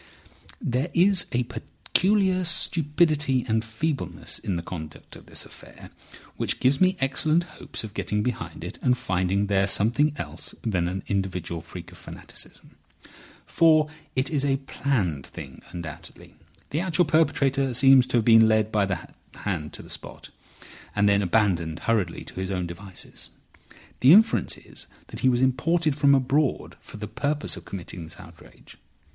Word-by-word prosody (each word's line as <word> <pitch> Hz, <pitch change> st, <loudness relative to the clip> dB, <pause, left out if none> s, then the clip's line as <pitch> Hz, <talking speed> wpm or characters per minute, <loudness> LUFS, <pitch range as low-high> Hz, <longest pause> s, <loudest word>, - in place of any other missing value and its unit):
"There 140 Hz, -, -1 dB
is 185 Hz, +1 st, +4 dB
a 125 Hz, +1 st, +1 dB
peculiar 185 Hz, -, +1 dB
stupidity 150 Hz, -5 st, +1 dB
and 110 Hz, -1 st, +1 dB
feebleness 130 Hz, +6 st, -3 dB
in 95 Hz, -, -3 dB
the 85 Hz, -, -3 dB
conduct 80 Hz, -4 st, -8 dB
of -, -, -14 dB
this -, -, -4 dB
affair -, -, -14 dB, 0.5 s
which -, -, -1 dB
gives 135 Hz, +4 st, +2 dB
me 185 Hz, 0 st, +4 dB
excellent 155 Hz, +5 st, +2 dB
hopes 175 Hz, -, -8 dB
of 105 Hz, -2 st, -8 dB
getting 105 Hz, 0 st, -1 dB
behind 125 Hz, -1 st, -4 dB
it -, -, -7 dB
and 125 Hz, 0 st, +2 dB
finding 95 Hz, -3 st, 0 dB
there 95 Hz, -1 st, +2 dB
something 120 Hz, +10 st, +2 dB
else 80 Hz, 0 st, -7 dB
than 90 Hz, -7 st, 0 dB
an 95 Hz, +2 st, -4 dB
individual 90 Hz, -4 st, -2 dB
freak -, -, -10 dB
of -, -, -15 dB
fanaticism. -, -, -8 dB, 0.7 s
For 155 Hz, -2 st, +4 dB, 0.2 s
it 130 Hz, +3 st, 0 dB
is 145 Hz, -3 st, +1 dB
a 135 Hz, -1 st, +2 dB
planned 115 Hz, -, -2 dB
thing, -, -, -10 dB
undoubtedly. 85 Hz, -4 st, -9 dB, 0.4 s
The 150 Hz, -, 0 dB
actual 175 Hz, -1 st, +2 dB
perpetrator 140 Hz, -3 st, +2 dB
seems 135 Hz, 0 st, +6 dB
to -, -, +1 dB
have 115 Hz, -, +1 dB
been 115 Hz, -1 st, +7 dB
led 110 Hz, -1 st, +2 dB
by 105 Hz, -2 st, +2 dB
the 95 Hz, -3 st, -4 dB, 0.3 s
hand 80 Hz, -7 st, -3 dB
to -, -, -8 dB
the -, -, -14 dB
spot, -, -, -8 dB, 0.6 s
and 105 Hz, 0 st, +3 dB
then 100 Hz, 0 st, +4 dB
abandoned 90 Hz, -5 st, +1 dB
hurriedly 100 Hz, -8 st, 0 dB
to -, -, -9 dB
his 95 Hz, 0 st, -3 dB
own 90 Hz, -2 st, -2 dB
devices. 90 Hz, +2 st, -9 dB, 0.7 s
The 130 Hz, +5 st, +7 dB
inference 220 Hz, +3 st, +4 dB
is -, -, -8 dB, 0.2 s
that -, -, -7 dB
he 130 Hz, -, +3 dB
was 125 Hz, 0 st, +2 dB
imported 155 Hz, +4 st, +2 dB
from 140 Hz, -1 st, +5 dB
abroad 135 Hz, +2 st, 0 dB
for -, -, -12 dB
the 105 Hz, 0 st, -5 dB
purpose 145 Hz, +5 st, -1 dB
of -, -, -11 dB
committing 90 Hz, -2 st, -7 dB
this 80 Hz, -, -9 dB
outrage. -, -, -15 dB
120 Hz, 160 wpm, -25 LUFS, 95-150 Hz, 0.7 s, been